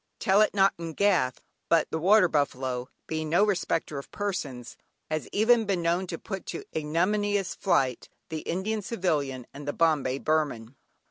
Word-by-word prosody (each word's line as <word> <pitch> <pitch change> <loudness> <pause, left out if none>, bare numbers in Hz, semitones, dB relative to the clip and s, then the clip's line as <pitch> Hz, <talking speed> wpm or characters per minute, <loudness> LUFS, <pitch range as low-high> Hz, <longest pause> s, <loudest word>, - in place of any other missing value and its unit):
"Tell 195 +2 +3
it 215 - +2
not 195 0 +4
in 165 -1 -5
Gath" 150 -10 +2 0.3
but 165 -2 +3
the 160 - -1
water 190 +3 +5
buffalo, 130 -4 -1 0.2
being 155 -1 -3
no 175 +6 +4
respector 170 -7 -1
of 140 - -11
persons, 145 - -4 0.4
has 155 -1 -2
even 225 +2 +4
been 190 -4 0
known 175 +3 +1
to 165 - -4
put 195 -1 -7
to - - -5
ignominious 190 +5 0
flight 135 - 0 0.2
the 160 -1 -3
"Indian 200 +7 -2
Civilian" 150 - -1
and 145 +1 -9
the 145 - -1
"Bombay 150 -6 +2
Burman." 140 -6 -1
165 Hz, 160 wpm, -27 LUFS, 145-195 Hz, 0.4 s, water